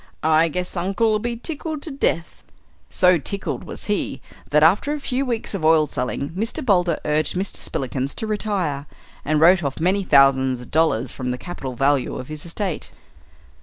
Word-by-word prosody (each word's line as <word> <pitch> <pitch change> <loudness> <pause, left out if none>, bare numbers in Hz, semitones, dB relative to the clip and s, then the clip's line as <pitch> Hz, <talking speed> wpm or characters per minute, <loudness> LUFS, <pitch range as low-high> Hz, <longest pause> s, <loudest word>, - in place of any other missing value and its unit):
I 160 +1 +4
guess 180 +3 -4
uncle'll 200 +5 +1
be 235 +2 -2
tickled 310 +3 -4
to 320 - -5
death." 170 -11 -2 0.5
So 180 -2 +4
tickled 195 +7 -3
was - - -7
he 205 -9 -1 0.3
that 150 +1 +4
after 200 - +4
a 300 - -3
few 270 -1 -2
weeks 230 -3 -3
of 195 -5 -4
oil 155 -1 +5
selling 135 +1 -3
Mr. 220 +8 -3
Boulder 180 -7 +2
urged 150 +3 0
Mr. 190 +2 -2
Spillikins 135 +1 -3
to - - -3
retire, 195 -10 -2 0.4
and 155 0 +1
wrote 175 +2 +6
off 140 -1 -3
many 190 +4 +1
thousand 130 -5 +3
dollars 140 -7 +2
from 125 -1 -4
the 125 - -2
capital 135 -4 -6
value 135 +1 +1
of 130 - -7
his 155 +2 -7
estate. 180 0 -3
165 Hz, 170 wpm, -22 LUFS, 140-205 Hz, 0.5 s, wrote